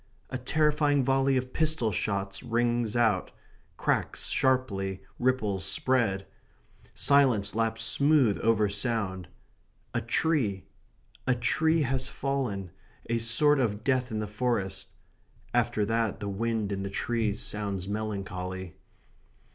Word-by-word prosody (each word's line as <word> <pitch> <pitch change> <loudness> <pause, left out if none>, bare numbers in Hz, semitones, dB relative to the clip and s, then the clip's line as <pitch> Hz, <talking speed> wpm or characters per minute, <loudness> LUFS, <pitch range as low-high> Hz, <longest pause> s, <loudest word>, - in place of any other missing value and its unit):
A 130 - -1
terrifying 150 +1 +2
volley 135 +1 +2
of 130 0 -3
pistol 155 -8 +1
shots 100 0 -2
rings 120 -1 0
out 110 -6 +2 0.5
cracks - - -1
sharply; 100 -8 0 0.2
ripples 110 -7 0
spread 115 -7 +1 0.7
silence 130 -8 +4
laps 115 0 0
smooth 140 -3 +3
over 110 -2 +3
sound. 100 -4 -2 0.7
A 120 - 0
tree 115 - 0 0.6
a 125 - +3
tree 160 +7 +2
has 130 0 -1
fallen, 120 -10 -2 0.4
a 115 - +2
sort 135 +6 +3
of 110 -4 -1
death 130 -1 +1
in 110 - -3
the 105 - -2
forest. 105 -3 -2 0.7
After 105 - +1
that, 115 -2 0
the 100 -1 -4
wind 110 0 -1
in 95 -1 -2
the 100 - -3
trees 110 0 -1
sounds 100 -3 -2
melancholy. 95 -4 -4
115 Hz, 120 wpm, -28 LUFS, 100-130 Hz, 0.7 s, silence